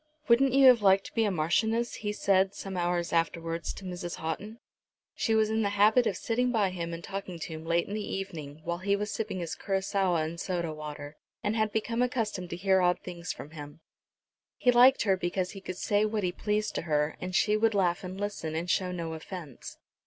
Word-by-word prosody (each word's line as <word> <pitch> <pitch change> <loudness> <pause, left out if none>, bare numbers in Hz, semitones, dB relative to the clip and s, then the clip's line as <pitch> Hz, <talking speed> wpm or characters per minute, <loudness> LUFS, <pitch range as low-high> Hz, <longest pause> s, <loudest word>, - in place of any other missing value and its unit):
"Wouldn't 255 +2 +4
you 275 0 +6
have 250 -3 +8
liked 195 -1 +4
to - - -10
be 225 -1 +2
a - - +2
marchioness," 220 +8 0
he 210 -1 -3
said, 195 -1 +2
some 195 -1 -6
hours 175 -1 -1
afterwards, 165 0 -1
to - - -11
Mrs. 175 -1 -5
Houghton. 200 +8 -5 0.6
She 225 - 0
was 220 0 +3
in 220 0 +1
the 205 - +1
habit 220 +4 +5
of - - -1
sitting 250 0 0
by 205 -5 +2
him 170 -2 -4
and 170 0 -6
talking 195 -3 -5
to 165 0 -6
him 160 0 -8
late 170 +1 +2
in 200 - -5
the 215 - -2
evening, 155 -6 -6
while 170 +1 -3
he 200 +2 +1
was 210 +1 -3
sipping 215 -3 -3
his 165 -2 -4
curaçoa 190 -4 0
and 165 +2 -6
soda 170 -3 -2
water, 150 -1 -8 0.3
and 210 +1 0
had 215 -1 +1
become 230 +2 -1
accustomed 220 -7 -1
to - - -4
hear 190 +1 +3
odd 180 0 +3
things 175 -1 -5
from 150 - -9
him. 145 -1 -9 0.8
He 250 - +4
liked 250 +2 +6
her 195 -3 +3
because 180 0 -2
he 195 - -9
could 185 -1 -6
say 205 +2 +1
what 215 -1 -1
he 180 - +1
pleased 210 +3 -1
to - - -2
her, 150 0 +1
and 185 0 -4
she 210 +3 +3
would 220 0 +2
laugh 180 -3 +1
and 185 +1 -6
listen, 200 -6 -3
and 165 +2 -2
show 180 +1 +1
no 170 -2 -4
offence. 160 -4 -8
190 Hz, 220 wpm, -29 LUFS, 170-215 Hz, 0.8 s, have